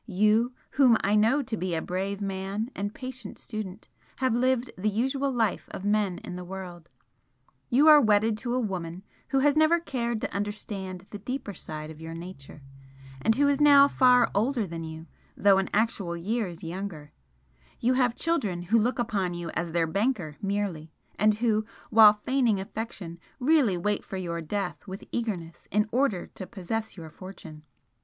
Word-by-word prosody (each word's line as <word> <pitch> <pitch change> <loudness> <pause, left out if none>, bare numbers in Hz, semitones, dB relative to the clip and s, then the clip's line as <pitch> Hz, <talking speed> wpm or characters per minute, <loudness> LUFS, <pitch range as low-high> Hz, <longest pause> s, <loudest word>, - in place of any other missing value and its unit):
You, 215 +5 +2 0.2
whom 255 -5 +5
I 200 - +1
know 225 +7 +4
to 240 -3 -3
be 185 -4 -2
a 160 - -1
brave 195 +2 -3
man 195 +4 -3
and 205 +1 -3
patient 255 -3 -8
student, 215 -2 -7 0.3
have 260 -3 +1
lived 255 0 +1
the 200 +3 0
usual 265 +6 0
life 225 -6 0
of 190 - -7
men 205 -3 +1
in 180 - -6
the 180 - -6
world 180 -2 -8 0.8
you 280 +6 +5
are 300 -1 +9
wedded 215 -1 +3
to 240 +1 -2
a - - +1
Woman 185 -5 -4 0.2
who 270 -1 +1
has 290 +1 +4
never 315 +2 +4
cared 235 -8 -2
to - - -3
understand 200 -2 -4
the 205 - -6
deeper 250 -1 -5
side 155 -2 -7
of 160 0 -12
your 165 0 -7
nature, 165 -4 -10 0.6
and 220 - +3
who 285 +3 +3
is 285 0 +2
now 285 -1 +8
far 250 -3 +4
older 230 +2 +1
than 165 -2 -6
you, 160 0 -8 0.3
though 195 -1 +5
in 195 - -2
actual 205 -5 0
years 190 -1 -3
younger, 170 -3 -6 0.7
you 250 +2 +2
have 250 -2 +2
children 210 - -1
who 220 +6 +3
look 240 +4 +1
upon 200 -7 -1
you 175 -1 -5
as 170 -1 -3
their 170 0 +2
banker 195 - -1
merely 195 -6 -2 0.3
and 215 0 +4
who, 220 -1 +1 0.3
while 215 -1 +9
feigning 230 -1 +1
affection, 190 -4 -6 0.2
really 260 - +3
wait 205 +4 -1
for 190 - -6
your 170 -2 -3
death 200 +5 -4
with 190 +1 -7
eagerness 185 -8 -4
in 210 +2 +2
order 245 -7 +1
to 185 - -9
possess 220 +2 -4
your 160 -2 -9
fortune. 175 -5 -11
205 Hz, 175 wpm, -27 LUFS, 180-240 Hz, 0.8 s, are